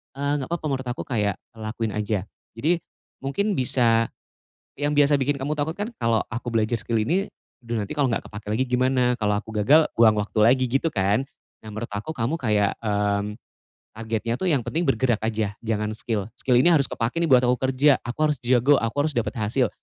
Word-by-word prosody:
eee, 140 +1 -1
enggak 130 - -5
papa 170 - -4
menurut 130 -1 -2
aku 125 - -3
kayak 105 -6 -1 0.2
lakuin 110 0 -3
aja. 105 -1 -1 0.3
Jadi, 155 +10 +1 0.4
mungkin 200 +11 -1
bisa 115 -3 +3 0.7
yang 145 +1 -1
biasa 145 0 +5
bikin 140 +1 0
kamu 140 +3 -2
takut 150 +2 -2
kan, 205 +2 -3
"Kalau 115 -1 +2
aku 120 +2 -5
belajar 115 0 +1
skill 115 +3 -1
ini, 175 - 0 0.3
aduh 115 0 -3
nanti 100 +9 -5
kalo 140 -4 +1
enggak - - -2
kepakai 105 0 -9
lagi 130 - +2
gimana? 125 +1 +2
Kalau 105 -2 +1
aku 110 - -11
gagal 145 +10 +5
buang 115 -2 +6
waktu 105 +1 -2
lagi," 130 +3 +4
gitu 135 +6 0
kan? 100 +3 +1 0.4
Nah, 110 - -9
menurut 110 +2 -5
aku 105 +9 -5
kamu 125 +1 -1
kayak, 105 -7 +1
mmm, 105 0 -1 0.6
targetnya 115 +1 -2
tuh 190 - -2
yang 140 -6 +2
penting 165 +8 -2
bergerak 130 -4 +2
aja, 110 -2 -1
jangan 105 -2 -2
skill, 110 -1 -3
"Skill 125 - +1
ini 175 - +5
harus 150 -5 +4
kepakai 115 +7 -2
nih - - +2
buat 130 -1 +6
aku 125 +1 +3
kerja, 140 +2 +4
aku 120 - -5
harus 150 - -2
jago, 130 +3 +4
aku 115 +2 -3
harus 155 - -3
dapat 120 +2 -1
hasil." 115 +3 +1
120 Hz, 200 wpm, -24 LUFS, 110-140 Hz, 0.7 s, buang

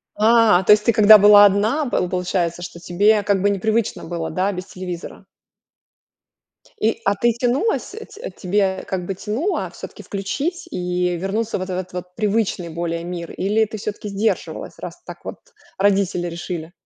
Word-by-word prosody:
А, 220 -3 +5
то 210 - +7
есть, 210 0 +1
ты 235 - +4
когда 215 0 +9
была 205 0 +8
одна, 215 +10 +2
п 180 - 0
получается, 175 -1 -2
что 175 -1 -8
тебе 205 +5 +2
как 200 -1 +1
бы 205 - +3
непривычно 215 +3 -1
было, 165 -1 -4
да, 185 +4 0
без 180 -1 -6
телевизора. 180 -2 -8 1.6
И. 220 +1 +1
А 200 - +2
ты 235 +4 +2
тянулась, 250 - 0
т 445 +2 -9
тебе 190 0 -1
как 185 -2 -3
бы 195 - -3
тянуло 230 - -2
всё-таки - - -10
включить 290 - -4
и 180 -3 -1
вернуться 210 +5 -2
вот 185 -1 -5
в - - -3
этот 185 0 -5
вот 180 0 -7
привычный 210 -5 -1
более 170 0 -3
мир? 175 -1 -6
Или 210 +3 +1
ты 215 +1 -7
всё-таки 210 0 -5
сдерживалась, 205 +3 -3
раз - - -8
так - - -11
вот - - -6 0.4
родители 195 -3 +1
решили? 170 -1 -6
200 Hz, 165 wpm, -21 LUFS, 180-220 Hz, 1.6 s, когда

